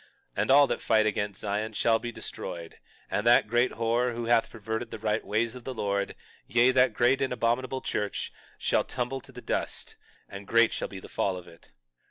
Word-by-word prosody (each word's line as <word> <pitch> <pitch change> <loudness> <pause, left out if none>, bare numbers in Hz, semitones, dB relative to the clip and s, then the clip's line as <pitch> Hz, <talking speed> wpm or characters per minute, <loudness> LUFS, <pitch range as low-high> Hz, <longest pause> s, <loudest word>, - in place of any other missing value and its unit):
And - - 0
all 140 +2 +8
that - - -2
fight 110 -1 +3
against 105 -2 -2
Zion 105 +1 -2
shall 115 +1 +2
be 120 - -5
destroyed, 85 -6 -7 0.3
and 105 - 0
that 120 -2 +6
great 120 +3 +2
whore, 120 +1 0
who 120 0 -3
hath 115 -1 +3
perverted 110 +1 -4
the 115 - -6
right 110 0 -1
ways 115 +2 0
of 125 -1 -10
the 130 0 -5
Lord, 100 -2 -1 0.3
yea, 120 +1 +4
that 125 -3 +3
great 125 +3 +3
and 135 - 0
abominable 125 +2 0
church, 105 -3 -3 0.2
shall - - +1
tumble 130 +1 -3
to - - -15
the - - -11
dust - - -3 0.3
and 100 0 -9
great 115 0 +4
shall - - -2
be 95 - -8
the - - -11
fall 95 -2 -1
of 90 - -10
it. 85 - -17
115 Hz, 205 wpm, -28 LUFS, 105-125 Hz, 0.3 s, all